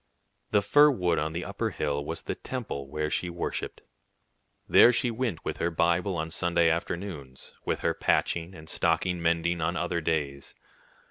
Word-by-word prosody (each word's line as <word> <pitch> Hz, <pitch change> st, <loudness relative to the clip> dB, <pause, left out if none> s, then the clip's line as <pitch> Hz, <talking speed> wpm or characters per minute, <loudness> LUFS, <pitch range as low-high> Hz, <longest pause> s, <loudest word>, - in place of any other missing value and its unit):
The 105 Hz, -1 st, +3 dB
fir 145 Hz, +9 st, +6 dB
wood 90 Hz, -, +1 dB
on 75 Hz, +1 st, -1 dB
the 85 Hz, +1 st, -3 dB
upper -, -, -2 dB
hill 70 Hz, -1 st, -2 dB
was -, -, -5 dB
the -, -, -3 dB
temple 110 Hz, -, -5 dB
where 75 Hz, +1 st, -2 dB
she 90 Hz, -, -1 dB
worshipped. 85 Hz, 0 st, -4 dB, 0.9 s
There 120 Hz, -, +7 dB
she 120 Hz, 0 st, +1 dB
went 115 Hz, -7 st, -3 dB
with -, -, -3 dB
her 85 Hz, -, 0 dB
Bible 85 Hz, +3 st, +1 dB
on 80 Hz, 0 st, -3 dB
Sunday 85 Hz, -1 st, +2 dB
afternoons, 85 Hz, -6 st, -5 dB
with -, -, -1 dB
her -, -, +1 dB
patching 85 Hz, +2 st, 0 dB
and 80 Hz, 0 st, -12 dB
stocking 85 Hz, +2 st, 0 dB
mending 85 Hz, +1 st, +1 dB
on 85 Hz, +3 st, 0 dB
other 85 Hz, -1 st, -1 dB
days. 75 Hz, -4 st, -2 dB
85 Hz, 170 wpm, -28 LUFS, 80-90 Hz, 0.9 s, There